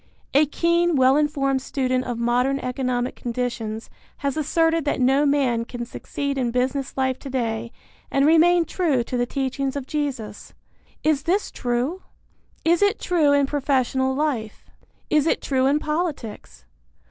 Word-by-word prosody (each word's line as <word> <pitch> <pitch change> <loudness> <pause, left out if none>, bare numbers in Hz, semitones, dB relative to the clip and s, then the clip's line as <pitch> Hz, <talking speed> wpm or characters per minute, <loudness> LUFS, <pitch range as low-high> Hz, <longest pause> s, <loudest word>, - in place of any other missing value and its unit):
A 290 +2 +5
keen, 340 +2 +2
well 260 0 +5
informed 280 -3 +1
student 255 -1 -1
of 245 -2 -3
modern 245 +3 +1
economic 250 -1 -2
conditions 235 -2 -4 0.3
has 280 -2 -2
asserted 325 +1 +1
that 290 - -1
no 270 +3 +3
man 260 -5 +2
can 240 0 -6
succeed 280 +3 -4
in 245 -2 0
business 260 +3 -1
life 260 -1 0
today 235 -4 -3 0.4
and 275 0 +2
remain 335 +2 +5
true 310 -7 0
to 250 - -5
the 245 0 0
teachings 270 0 -2
of 280 -2 -4
Jesus. 260 -9 -4 0.5
Is 310 -2 +2
this 365 +7 0
true? 250 +9 -2 0.6
Is 340 +2 +3
it 405 +2 +3
true 325 -5 +2
in 285 -1 +4
professional 265 -2 0
life? 265 -8 -2 0.5
Is 305 0 +3
it - - +2
true 265 -1 +1
in 285 +2 +3
politics? 285 - -4
270 Hz, 145 wpm, -23 LUFS, 250-300 Hz, 0.6 s, A